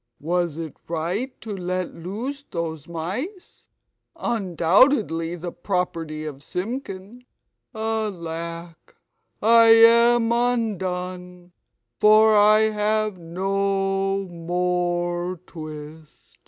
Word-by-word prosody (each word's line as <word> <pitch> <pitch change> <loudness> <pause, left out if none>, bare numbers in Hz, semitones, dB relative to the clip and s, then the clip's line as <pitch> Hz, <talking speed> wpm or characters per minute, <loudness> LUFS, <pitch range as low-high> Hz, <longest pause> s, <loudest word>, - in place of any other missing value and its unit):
Was 170 0 -1
it 160 -3 -6
right 175 +11 -3
to 215 -3 -5
let 185 -1 -3
loose 225 +12 -5
those 160 -3 -4
mice, 205 - -6 0.5
undoubtedly 185 - +2
the 175 0 -6
property 170 -4 -3
of 140 -3 -7
Simpkin? 205 - -6 0.5
Alack, 170 -6 -5 0.5
I 230 +1 +7
am 230 +1 +6
undone, 185 -7 -2 0.5
for 215 +1 +6
I 210 +1 +6
have 215 -1 0
no 195 +2 -1
more 175 0 -2
twist!" 155 -1 -11
185 Hz, 85 wpm, -23 LUFS, 170-215 Hz, 0.5 s, I